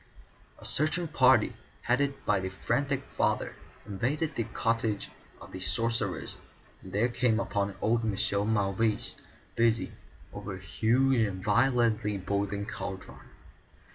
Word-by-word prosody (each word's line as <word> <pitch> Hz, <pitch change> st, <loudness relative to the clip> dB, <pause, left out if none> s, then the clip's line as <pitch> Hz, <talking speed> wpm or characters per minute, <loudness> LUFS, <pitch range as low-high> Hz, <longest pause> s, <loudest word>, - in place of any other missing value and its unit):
A -, -, -13 dB
searching 155 Hz, +4 st, +2 dB
party, 130 Hz, -7 st, +4 dB, 0.3 s
headed 135 Hz, +2 st, 0 dB
by 100 Hz, -, +3 dB
the 95 Hz, 0 st, -3 dB
frantic 135 Hz, +8 st, -1 dB
father, -, -, 0 dB, 0.3 s
invaded 130 Hz, +10 st, -1 dB
the 115 Hz, -, -1 dB
cottage 115 Hz, -2 st, -1 dB, 0.3 s
of -, -, -12 dB
the 95 Hz, -, -6 dB
sorcerers 115 Hz, +4 st, -1 dB, 0.4 s
and 95 Hz, -, -11 dB
there 105 Hz, +5 st, +2 dB
came 120 Hz, -2 st, +1 dB
upon 100 Hz, -3 st, -1 dB
old 115 Hz, +1 st, +2 dB
Michel 100 Hz, -1 st, 0 dB
Mauvais, 105 Hz, 0 st, +1 dB, 0.4 s
busy 115 Hz, -1 st, +2 dB, 0.4 s
over 95 Hz, -2 st, -5 dB
a -, -, -9 dB
huge 120 Hz, +7 st, +2 dB
and 95 Hz, -4 st, 0 dB
violently 115 Hz, -2 st, +2 dB
boiling 100 Hz, +1 st, -2 dB
cauldron. 100 Hz, -3 st, -6 dB
115 Hz, 125 wpm, -29 LUFS, 100-125 Hz, 0.4 s, party